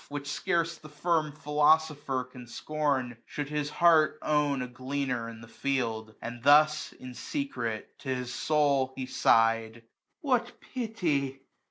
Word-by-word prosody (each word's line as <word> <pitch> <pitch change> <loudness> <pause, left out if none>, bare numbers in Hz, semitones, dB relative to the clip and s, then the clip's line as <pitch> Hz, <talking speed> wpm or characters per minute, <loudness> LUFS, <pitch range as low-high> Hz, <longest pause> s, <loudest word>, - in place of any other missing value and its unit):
Which 145 0 -5
scarce 170 -2 0
the 155 - -12
firm 155 0 0
philosopher 150 -2 +2
can 125 -1 -12
scorn. 135 -2 -1
Should 145 -1 -4
his 150 -1 -2
heart 160 -1 +4
own 145 -3 +1
a - - -5
gleaner 130 -1 -3
in 115 -1 -10
the 115 - -11
field 115 -2 -2
j 110 - -18
235 120 +2 -7
And 120 -1 -13
thus 150 +2 +5
in 130 -1 -10
secret 120 - -4
to 135 - -7
his 125 -1 -4
soul 140 -4 +2
he 130 - -4
sigh'd: 115 -2 +2 0.4
What 250 -5 0
pity 160 - -1
140 Hz, 150 wpm, -29 LUFS, 125-155 Hz, 0.4 s, thus